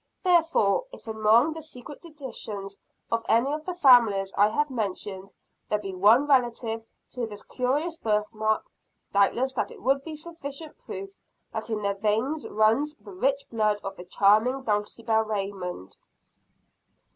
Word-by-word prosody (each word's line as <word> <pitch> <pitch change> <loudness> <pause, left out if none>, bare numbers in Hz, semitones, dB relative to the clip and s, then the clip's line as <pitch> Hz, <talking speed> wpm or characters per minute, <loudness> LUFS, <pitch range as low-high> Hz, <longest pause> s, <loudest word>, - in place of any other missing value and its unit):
Therefore, 335 - +3
if - - -13
among 220 +7 +3
the 320 - -7
secret 290 -2 -10
traditions 225 - -7 0.3
of 230 0 0
any 250 +5 +3
of 305 +1 -4
the 360 - -4
families 230 - +5
I 205 - +5
have 295 +7 0
mentioned, 195 -4 -4 0.4
there 210 - +2
be 195 -2 -6
one 215 +9 +5
relative 240 -4 +1 0.3
to 245 -3 -3
this 205 -1 -8
curious 290 +7 -1
birth 210 -1 +1
mark, 215 0 0 0.5
doubtless 235 +6 +2
that - - -2
would 275 +1 +1
be 315 0 -6
sufficient 310 -1 -8
proof 395 -5 -8 0.3
that - - -3
in 215 -2 -2
their 200 0 +1
veins 220 +9 -1
runs 225 +8 +2
the 205 -2 -13
rich 270 +8 +1
blood 215 -2 +1
of 195 - -5
the 180 - -10
charming 215 +8 +3
Dulcibel 220 +1 0
Raymond. 195 - -4
225 Hz, 145 wpm, -26 LUFS, 205-280 Hz, 0.5 s, families